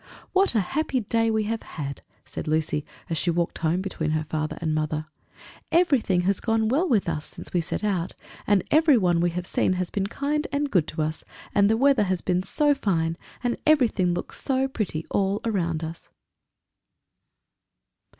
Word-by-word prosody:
"What 385 -8 +3
a 220 - +4
happy 270 +5 -1
day 225 +2 +1
we 220 -1 +1
have 225 +1 -2
had!" 140 -3 -6 0.2
said 130 - -6
Lucy 155 -1 0 0.2
as 165 -2 0
she 175 - +1
walked 170 0 0
home 170 +3 +1
between 165 -5 -2
her 155 - -2
father 155 0 -3
and 160 -2 -1
mother. 155 0 -1 0.7
"Everything 275 - +3
has 190 +2 +1
gone 225 -1 +1
well 315 +9 +2
with 215 -8 +2
us 155 -3 -2
since - - -9
we 175 - +2
set 165 - -3
out, 190 -4 -1 0.3
and 200 -3 +4
everyone 235 - +4
we 175 - +3
have 175 +1 -4
seen 185 - +1
has 180 -1 -2
been 195 -1 -1
kind 295 +6 -1
and 285 0 -1
good 170 -5 +3
to 155 0 -2
us; 155 +1 -3 0.3
and 200 0 +4
the 225 - +3
weather 270 -4 +4
has 185 -2 0
been 180 -1 +1
so 290 +10 +2
fine, 165 -11 0 0.3
and 245 -1 0
everything 240 - +4
looks 175 - -5
so 265 0 +1
pretty 200 -11 -3
all 195 +1 +1
around 170 -7 -1
us!" 165 +1 -7
190 Hz, 180 wpm, -25 LUFS, 165-240 Hz, 0.7 s, a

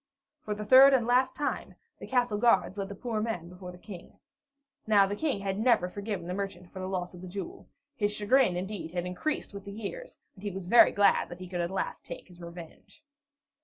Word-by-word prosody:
For 210 - -3
the 210 0 -6
third 265 +4 +8
and 240 -3 +1
last 250 +2 +2
time, 290 - -3 0.2
the - - -8
castle 245 -5 +1
guards 205 -4 +3
led 195 0 -3
the 200 - -7
poor 225 0 -3
man 180 -7 -3
before 180 0 -9
the 180 - -12
King. 180 -2 -11 0.7
Now 205 -2 +6
the 200 +1 -3
King 270 -4 -1
had 195 0 -2
never 225 -6 +3
forgiven 200 -1 -5
the 180 - -4
merchant 185 -2 -5
for 190 - -8
the 185 - -4
loss 185 -1 -3
of 180 - -11
the 185 - -8
jewel; 185 0 -7 0.3
his 205 -5 0
chagrin, 210 -1 +2
indeed, 180 -3 -5
had 175 -1 -2
increased 205 +9 -3
with 200 -1 -8
the 200 - -8
years, 225 - -7 0.2
and 190 - -16
he 205 - -3
was 190 -1 -6
very 235 +7 +7
glad 205 0 +3
that 175 - -8
he 185 0 -8
could 175 -1 -3
at 170 - -1
last 190 - -3
take - - -9
his 175 -1 -15
revenge. 170 - -12
200 Hz, 225 wpm, -29 LUFS, 180-220 Hz, 0.7 s, third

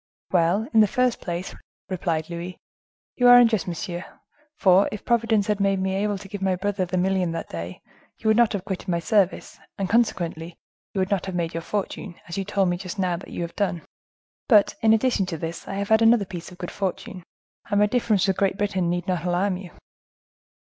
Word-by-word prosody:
"Well, 180 +5 +2
in 225 - +5
the 215 - +6
first 250 +3 0
place," 175 +1 -4 0.3
replied 165 -4 -2
Louis, 175 +1 -6 0.6
"you 245 - +4
are 245 0 +10
unjust, 225 -7 +4
monsieur; 175 0 -4 0.5
for, 190 -7 +4
if 210 - -7
Providence 230 -3 +2
had 210 -1 0
made 195 -1 +2
me 190 0 -1
able 205 +1 0
to 195 +1 -11
give 200 0 -7
my 190 -1 +1
brother 195 0 -1
the 185 +1 -3
million 185 -2 +1
that 165 - -5
day, 85 +2 -7 0.3
you - - -5
would 220 - +5
not 235 -1 +4
have 195 -2 -3
quitted 190 -1 -5
my 170 - +1
service, 190 +2 0 0.2
and, 195 - -1
consequently, 170 -7 0 0.4
you - - 0
would 185 - -1
not 195 -2 0
have 190 - -4
made 170 -2 -2
your 165 - -3
fortune, 195 -1 -4
as 170 - -6
you 195 - -1
told 195 -1 +1
me 175 - 0
just 185 +2 -7
now 180 -3 0
you - - -5
have 170 - -7
done. 185 -5 -1 0.6
But, 210 -5 +5
in 220 - +4
addition 220 -3 +2
to 170 -3 -4
this, 165 +2 -6
I 195 - -4
have 200 0 -3
had 220 0 +5
another 225 -2 +5
piece 180 -1 -8
of 180 - -13
good 175 - -6
fortune; 190 -1 -4 0.5
and 205 0 +2
my 210 - +5
difference 210 -3 +1
with 190 - +1
Great 195 -1 +1
Britain 195 -4 0
need 175 0 -1
not 180 -2 -1
alarm 180 +2 0
you." 185 -1 -9
190 Hz, 215 wpm, -24 LUFS, 175-205 Hz, 0.6 s, are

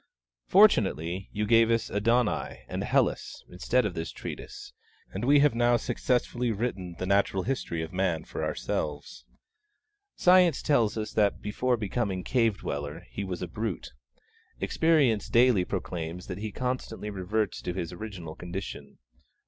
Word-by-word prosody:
Fortunately 85 +9 +3
you 105 +1 -1
gave 115 +1 +5
us 115 -1 0
'Adonai, 115 +3 0
and - - -3
'Hellas' - - 0
instead 115 +7 +1
of 100 - -2
this 80 -1 -4
treatise, - - -8 0.4
and 95 - -4
we 140 +3 +5
have 150 -3 +4
now 120 +1 +3
successfully 125 0 -1
written 100 -6 -3
the 95 - -3
natural 100 -1 +2
history 90 -10 -2
of 80 - -8
Man 90 -4 0
for - - -5
ourselves. 75 - -3 0.9
Science 180 -4 +5
tells 115 -7 +2
us 110 -1 -4
that 105 -2 +2
before 120 +4 0
becoming 100 -3 -2
cave 115 -1 +2
dweller 75 +3 -5
he 100 - -4
was 90 -2 -4
a - - -3
brute; 105 +2 -4 0.7
Experience 145 -10 +2
daily 120 -5 +5
proclaims 85 0 -4
that - - -6
he 110 0 -4
constantly 125 -3 -3
reverts 100 +2 -2
to - - -3
his 90 -2 -4
original 90 -5 -7
condition. 85 -5 -7
105 Hz, 145 wpm, -28 LUFS, 90-120 Hz, 0.9 s, gave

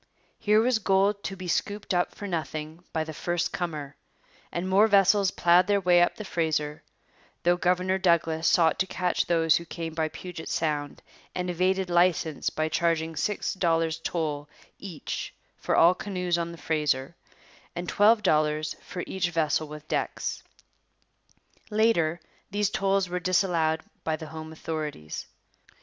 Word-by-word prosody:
Here 210 +1 +4
was 235 0 +2
gold 200 0 +2
to 195 - -3
be 185 -1 -7
scooped 205 +3 -1
up 175 0 0
for 205 - -7
nothing 160 -1 -4
by 160 - -1
the 155 0 -7
first 175 +2 -2
comer; 150 -5 -4 0.6
and 175 +2 -3
more 195 +3 +5
vessels 200 -1 +4
ploughed 175 0 +4
their 205 -1 +3
way 180 -2 +4
up 175 - +2
the 215 - -7
Fraser, 155 -4 -1 0.6
though 175 +1 +4
Governor 180 +1 +1
Douglas 165 -3 +2
sought 165 -3 +4
to 190 - +1
catch 180 -1 -1
those 165 -1 +4
who 170 - -5
came 165 -1 -6
by 160 -1 0
Puget 175 0 -8
Sound 150 -3 -2 0.3
and 180 0 -1
evaded 185 +1 0
licence 175 -3 +2
by 155 0 -1
charging 165 0 0
six 210 +7 -1
dollars 165 -3 +1
toll 150 -3 -3 0.3
each 185 -6 -6 0.2
for - - -1
all 170 +2 +6
canoes 180 -2 -2
on 170 0 -2
the 170 - -10
Fraser 150 -1 -1 0.6
and 175 +1 -4
twelve 215 +1 +4
dollars 155 -2 +1
for 180 - -6
each 190 -2 -1
vessel 155 -2 0
with 150 0 -10
decks. - - -2 1.3
Later 210 -7 +2 0.3
these 205 0 0
tolls 195 -1 +1
were 180 0 -2
disallowed 170 -3 +1 0.2
by 160 - 0
the 160 - -8
home 160 0 -8
authorities. 155 - -5
170 Hz, 155 wpm, -27 LUFS, 160-190 Hz, 1.3 s, all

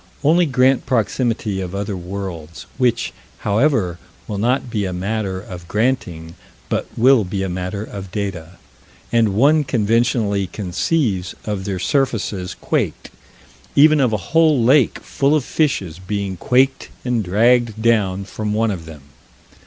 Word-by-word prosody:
Only 165 +4 +4
grant 130 -1 +2
proximity 110 -3 0
of 90 +1 -5
other 100 0 -3
worlds 90 -3 -7
which, 120 -2 +1 0.3
however, 105 - +1 0.3
will 105 -2 -4
not 125 +5 +1
be 105 -4 -1
a 90 - -3
matter 95 +1 -2
of 90 -3 -10
granting, 90 -8 -1 0.4
but - - -1
will 125 -1 +5
be 95 +1 -3
a 95 - -2
matter 90 +3 -4
of 100 -3 -8
data 90 -4 -5 0.5
and 110 -4 +2
one 150 +7 +4
conventionally 115 -4 +1
conceives 95 - -1
of 105 -3 -3
their 100 -2 -2
surfaces 100 -4 -1
quaked - - -2 0.6
even 155 +1 +6
of 125 -4 +2
a 110 - +1 0.2
whole 155 -6 +4
lake 130 +2 +4
full 140 +2 +1
of 145 -4 0
fishes 95 - -1
being 100 0 -3
quaked 130 +8 +1 0.2
and 120 -3 0
dragged 115 +3 +2
down 100 -4 +1
from 105 +1 -3
one 110 0 +1
of 85 -5 -6
them. 80 -4 -11
105 Hz, 145 wpm, -19 LUFS, 95-125 Hz, 0.6 s, even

